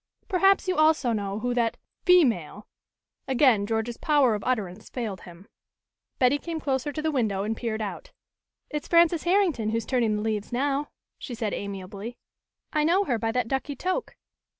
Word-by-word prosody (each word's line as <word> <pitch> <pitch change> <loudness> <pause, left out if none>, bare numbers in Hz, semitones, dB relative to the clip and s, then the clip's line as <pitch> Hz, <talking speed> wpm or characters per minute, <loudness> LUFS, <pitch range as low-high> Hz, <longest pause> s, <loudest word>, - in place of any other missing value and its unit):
"Perhaps 390 0 +3
you 370 - 0
also 310 -5 +4
know 200 -2 -2
who 245 0 0
that 235 -2 0 0.3
female 235 - +3 0.3
" - - -64 0.2
again 250 -6 +3
George's 225 +1 -2
power 285 -6 +3
of 210 - -3
utterance 215 -5 -2
failed 215 -7 -4
him. 175 +3 -13 0.7
Betty 260 +3 +3
came 330 0 -4
closer 275 -1 -1
to 305 +1 -5
the 315 - +1
window 215 -8 0
and 220 +2 -2
peered 220 -2 -3
out. - - -6 0.6
"It's 300 -1 -4
Frances 340 -1 +4
Herrington 345 - +2
who 225 - 0
is 230 - -3
turning 235 -4 +1
the 210 - -2
leaves 215 -2 -2
now," 280 +3 0 0.3
she 245 - -6
said 220 -3 -2
amiably. 200 +3 -6 0.6
"I 305 -1 +2
know 355 +6 +3
her 245 - -1
by 225 +1 0
that 245 0 0
ducky 270 +3 -2
toque." 370 - -3
245 Hz, 175 wpm, -26 LUFS, 215-305 Hz, 0.7 s, also